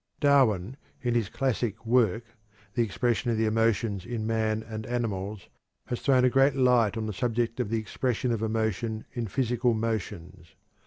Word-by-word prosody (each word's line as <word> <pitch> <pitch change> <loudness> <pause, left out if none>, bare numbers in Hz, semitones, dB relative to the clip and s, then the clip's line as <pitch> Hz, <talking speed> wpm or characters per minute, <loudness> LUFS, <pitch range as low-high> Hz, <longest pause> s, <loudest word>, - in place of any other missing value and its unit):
Darwin 130 - +3 0.3
in 120 -1 +1
his 115 -4 0
classic 120 -4 -2
work, 115 -2 +2 0.5
"The 120 - +1
Expression 120 +2 0
of 115 - +1
the 110 - +2
Emotions 110 -3 +1
in 115 0 -4
Man 110 -1 0
and 110 -1 -7
Animals," 105 -5 -3 0.4
has 120 - -4
thrown 130 -2 +4
a - - +5
great 135 +1 +4
light 125 -5 +3
on 110 - -2
the 105 - -3
subject 120 0 -1
of 120 -5 -1
the 115 - 0
expression 125 +3 -1
of 115 -2 -1
emotion 110 0 -1
in 120 -2 -3
physical 120 +1 +1
motions. 105 -7 -4
115 Hz, 165 wpm, -27 LUFS, 110-120 Hz, 0.5 s, a